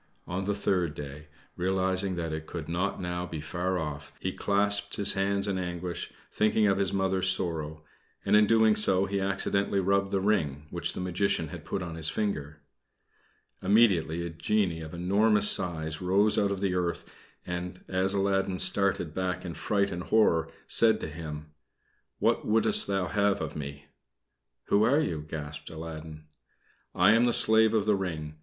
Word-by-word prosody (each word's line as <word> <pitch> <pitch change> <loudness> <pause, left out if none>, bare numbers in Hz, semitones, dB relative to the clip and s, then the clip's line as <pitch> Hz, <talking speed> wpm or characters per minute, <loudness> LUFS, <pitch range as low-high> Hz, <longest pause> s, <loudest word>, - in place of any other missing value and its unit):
On 95 +2 -4
the 100 0 -1
third 90 -6 0
day, 75 +1 -8 0.3
realizing 95 +1 0
that 85 -2 -3
it 80 0 -6
could 80 -3 -6
not 90 +4 -2
now 90 -1 -3
be 80 - -6
far 90 +4 -2
off, 75 -4 -5
he - - -2
clasped 100 0 0
his 100 -2 +2
hands 100 +1 0
in 95 -2 -1
anguish, 90 -1 -5 0.2
thinking 110 0 +2
of 100 -1 +2
his 95 -1 0
Mother's 95 -1 +1
sorrow; 80 -4 -2 0.4
and - - +3
in 105 0 +5 0.3
so 95 -2 +3
doing 100 - -9
he 100 - 0
accidently 100 0 0
rubbed 100 +1 +1
the 100 0 0
ring 80 -8 0
which - - -2
the - - -6
Magician 90 -2 -1
had - - -9
put 95 - -3
upon 85 -2 -6
his 80 -1 -1
finger. 75 -8 -3 1.0
Immediately 95 -5 +2
a 85 - -5
genie 85 0 -1
of 80 +1 -8
enormous 105 +4 +4
size 80 -2 -2
rose 100 +4 +3
out 100 - +2
of 100 -1 -3
the 95 -2 0
earth, 90 -2 -2 0.4
and, 90 0 -6
as 95 +1 +1
Aladdin 95 -1 0
started 95 -5 +1
back 95 +1 -3
in 85 - -5
fright 100 +5 -1
and 90 +1 -5
horror, 85 -7 +2 0.2
said 115 -1 +3
to - - -4
him: 75 -1 -8 0.7
"What - - +1
wouldst 160 - +3
thou 95 -2 0
have 100 +4 +1
of 80 -1 -5
me?" 70 -1 -7 0.8
"Who 100 - +4
are 130 +7 +4
you?" 85 - -2
gasped 75 0 -7
Aladdin. 80 -1 -8 0.7
"I 105 - +5
am 115 +2 +4
the 120 - +2
slave 110 0 +6
of 105 -2 +1
the 105 -1 +3
ring. 80 -5 -5
95 Hz, 175 wpm, -28 LUFS, 80-100 Hz, 1.0 s, slave